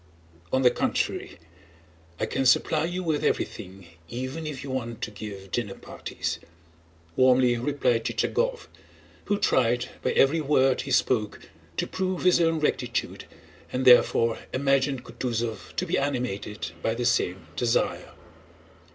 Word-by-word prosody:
On 130 0 +2
the 125 - +6
contrary, - - -1 0.8
I - - +1
can 135 - -1
supply 155 +5 +3
you 180 +2 -3
with 155 -3 0
everything 95 -2 -2 0.2
even 130 +6 -4
if 145 -4 -5
you 135 - -6
want 120 -3 -4
to - - -3
give 100 -2 -8
dinner 105 -5 -2
parties," - - -5 0.8
warmly 130 -1 +5
replied 125 -3 0
Chichagóv, - - 0 0.6
who 205 - +1
tried 120 - +2
by - - 0
every 155 +4 +4
word 135 -3 +3
he 135 - -6
spoke 115 -4 +1 0.4
to - - +1
prove 185 -1 -2
his 180 -1 +5
own 165 -1 +2
rectitude 150 - -1 0.5
and 130 +1 -1
therefore 115 -2 +5
imagined 135 -1 +1
Kutúzov 115 -4 -4
to 185 - -1
be 175 - 0
animated 120 -9 -3
by 115 - 0
the 120 +1 -2
same 95 -5 +1
desire. 120 -2 0
130 Hz, 135 wpm, -26 LUFS, 115-150 Hz, 0.8 s, the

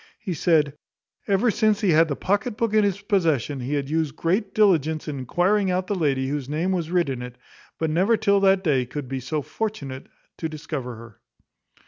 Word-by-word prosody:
He 190 - -4
said, 155 -3 +2 0.5
"Ever 200 +4 +3
since 215 0 +2
he 200 -4 +3
had 165 +1 +5
the 145 - -2
pocket 205 - -1
book 230 -2 0
in 215 -1 +5
his 200 -1 0
possession, 160 - 0
he 130 +4 -2
had 140 -1 -2
used 155 -1 -1
great 195 +6 0
diligence 160 - +2
in 145 -3 -4
enquiring 185 - +1
out 180 0 0
the 205 - -2
lady 140 -7 0
whose 140 -2 -3
name 165 +5 0
was 170 -4 -1
writ 175 -2 +2
in 130 -3 -3
it; 125 0 -8 0.4
but 160 -1 -1
never 190 +8 +3
till 200 -1 +3
that 195 -1 +3
day 135 -7 +1
could 145 +1 -6
be 135 +1 -3
so 145 +4 -3
fortunate 140 -13 -5 0.3
to 160 - -2
discover 145 -5 -5
her." 115 -2 -13
160 Hz, 200 wpm, -24 LUFS, 140-195 Hz, 0.5 s, had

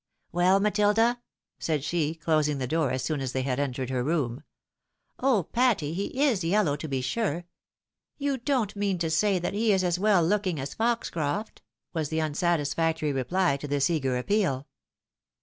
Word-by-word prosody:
" - - -48
Well, 180 +3 +4
MatUda? 210 +3 +2 0.2
" - - -66
said 155 -4 -1
she, 160 -1 -1
closing 155 -3 +1
the 130 - -2
door 155 +1 +1
as 130 0 -2
soon 150 -1 -1
as 130 -1 -3
they 130 - -1
had 130 0 -1
entered 130 -2 -2
her 125 -1 0
room. 140 -4 -1 0.4
" - - -50
Oh, 250 -8 +3
Patty! 225 - +1
he 200 +9 -1
is 235 - +2
yellow 170 -3 +2
to 150 +2 -6
be 135 -3 -2
sure. 175 - -1 0.7
You 280 -2 -1
don't 240 -5 0
mean 200 -2 0
to 165 -2 -1
say 195 +4 +2
that 175 +2 -2
he 215 +2 +2
is 190 -2 +2
as 180 0 0
well 200 -4 +4
looking 185 -3 0
as 135 +1 -5
Foxcroft? 220 -5 -2 0.2
" - - -58
was 160 -4 -2
the 160 - -2
unsatis 155 -1 0
factory 160 -3 0
reply 140 +3 +1
to 145 - -7
this 145 +3 +1
eager 135 -6 0
appeal. 145 -3 0
165 Hz, 190 wpm, -27 LUFS, 145-205 Hz, 0.7 s, Well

